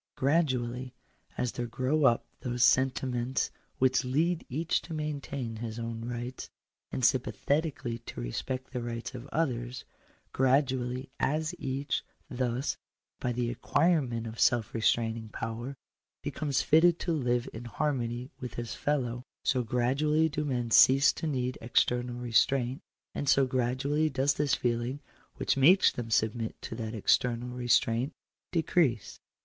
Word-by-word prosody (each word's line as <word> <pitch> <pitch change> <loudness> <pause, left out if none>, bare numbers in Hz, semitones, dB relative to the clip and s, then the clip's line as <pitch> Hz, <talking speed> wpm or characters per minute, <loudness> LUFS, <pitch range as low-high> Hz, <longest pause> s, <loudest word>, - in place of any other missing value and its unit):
Gradually, 130 -4 0 0.4
as 125 - 0
there 120 -1 -4
grow 130 +5 +1
up 120 -3 +4
those 125 -1 -1
sentiments 130 -1 +1 0.3
which 130 +1 +3
lead 160 +7 +1
each 160 +6 0
to 165 - -7
maintain 140 -6 -4
his 110 0 -5
own 115 -1 -4
rights, 120 +1 -5 0.4
and 130 - 0
sympathetically 130 -1 0
to 115 - -9
respect 130 - -4
the 125 - -2
rights 120 +1 -5
of 125 +1 -8
others 125 -5 -2 0.2
— - - -35
gradually; 130 -1 +1
as 155 +4 0
each, 135 +2 -2 0.3
thus, 125 +1 -1 0.4
by 125 - -1
the 120 0 -1
acquirement 130 -5 +1
of 110 0 -7
self 120 -3 +2
restraining 115 0 0
power, 115 +5 -5 0.5
be - - -2
comes 145 -3 0
fitted 165 +2 +5
to 170 - -1
live 125 -4 0
in 115 +2 -7
harmony 120 -1 -2
with 125 -2 -6
his 120 -1 -4
fellow 125 -5 -1
— - - -62
so 125 - +2
gradually 135 +7 +2
do 150 0 -2
men 125 -5 -2
cease 135 +4 +7
to 160 - -4
need 130 -3 -2
external 120 +1 +1
restraint, 125 +2 +1 0.3
and 145 - -2
so 135 -1 +5
gradually 130 +5 0
does 135 +1 +2
this 145 -2 +1
feeling 120 +3 -1 0.4
which - - 0
makes 165 +9 +6
them 120 -2 -5
submit 110 +1 0
to - - -7
that 115 0 -4
external 120 +3 +1
restraint 120 +1 +1 0.4
decrease. 160 - +1
125 Hz, 145 wpm, -30 LUFS, 120-140 Hz, 0.5 s, cease